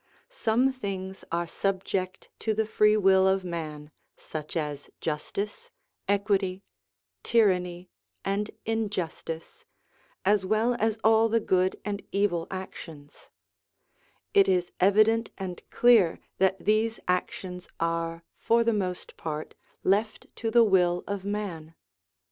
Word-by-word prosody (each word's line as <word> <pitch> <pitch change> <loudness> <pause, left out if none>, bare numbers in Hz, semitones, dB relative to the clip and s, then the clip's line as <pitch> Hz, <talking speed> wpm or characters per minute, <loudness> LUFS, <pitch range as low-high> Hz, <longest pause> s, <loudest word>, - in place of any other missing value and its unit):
Some 255 - +2
things 195 -5 -5
are 170 +1 0
subject 190 +1 -2
to 220 -1 0
the 220 +1 +1
free 215 0 +4
will 190 -2 +5
of 190 0 +2
man, 155 -4 -5 0.3
such 155 +1 -6
as 150 -2 -4
justice, 200 - -4 0.4
equity, 200 -2 +1 0.6
tyranny, 180 -5 +1 0.3
and 200 +2 -1 0.2
injustice, 200 -7 -3 0.6
as 205 -1 +3
well 215 +5 +2
as 220 0 +1
all 225 +1 +5
the 230 +1 +3
good 185 -3 +1
and 205 -1 -3
evil 195 -5 +1
actions; 165 -6 -9 1.0
it 400 -1 +6
is 180 -1 +1
evident 215 +4 +4
and 185 -3 -5
clear 230 -9 +5 0.2
that 190 0 +3
these 220 +2 +2
actions 180 0 -2
are, 165 0 -1
for 235 0 +2
the 230 0 +2
most 185 -4 -3
part, 155 -1 -5 0.3
left 210 +3 +1
to 225 - -2
the 235 +1 +6
will 180 -4 +3
of 200 -2 -4
man. 180 -6 -4
195 Hz, 120 wpm, -27 LUFS, 175-215 Hz, 1.0 s, it